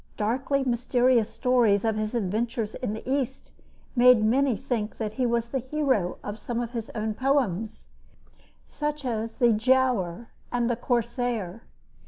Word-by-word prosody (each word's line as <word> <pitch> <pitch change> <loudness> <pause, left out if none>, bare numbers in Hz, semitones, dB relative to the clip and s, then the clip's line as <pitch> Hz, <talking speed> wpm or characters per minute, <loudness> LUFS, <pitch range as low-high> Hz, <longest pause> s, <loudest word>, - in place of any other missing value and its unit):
Darkly 265 +6 0
mysterious 245 -2 +2
stories 230 -3 +2
of 220 -1 +1
his 215 +2 -2
adventures 225 +1 -1
in 245 -5 -3
the 220 - -9
East 265 -1 -2 0.4
made 245 -2 +6
many 255 +1 +2
think 235 -5 -3
that 215 -2 -3
he 250 +2 0
was 235 0 0
the 265 - -1
hero 260 -8 0
of 205 +1 -6
some 235 +2 -3
of 240 -1 -3
his 230 -3 -5
own 215 0 -1
poems, 225 -5 -1 0.8
such 295 -1 -4
as 225 -2 -2
"The 240 -3 +4
Giaour" 235 -4 +1 0.2
and 240 -1 +1
"The - - +1
Corsair." 235 -4 -2
235 Hz, 150 wpm, -26 LUFS, 220-255 Hz, 0.8 s, made